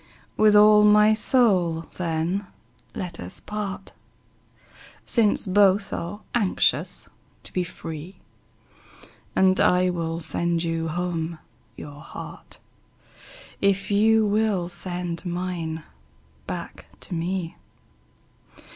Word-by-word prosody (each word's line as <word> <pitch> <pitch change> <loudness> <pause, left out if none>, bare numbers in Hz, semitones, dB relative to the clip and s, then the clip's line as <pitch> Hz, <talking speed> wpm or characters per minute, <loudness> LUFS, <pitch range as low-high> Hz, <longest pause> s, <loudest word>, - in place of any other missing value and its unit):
With 215 -1 +5
all 210 0 +7
my 210 +1 +6
soul, 195 -8 +2 0.2
then, 175 +3 -1 0.5
let 180 -2 -5
us 90 +1 -5
part, 200 -2 -5 1.1
Since 220 -4 +2
both 195 +1 +3
are 200 +5 -5
anxious 210 -6 +1 0.4
to - - -7
be 180 - 0
free; 165 +1 -8 1.2
And 190 0 +4
I 180 0 +3
will 165 -1 -3
sand 170 +1 -1
you 165 -1 -2
home 170 0 -3 0.4
your 145 0 -9
heart, - - -10 1.0
If 200 +1 +1
you 220 +2 +4
will 205 -4 +1
send 175 -1 -4
mine 175 -3 -4 0.6
back - - -7
to - - -7
me. 175 0 -3
180 Hz, 100 wpm, -24 LUFS, 170-205 Hz, 1.2 s, all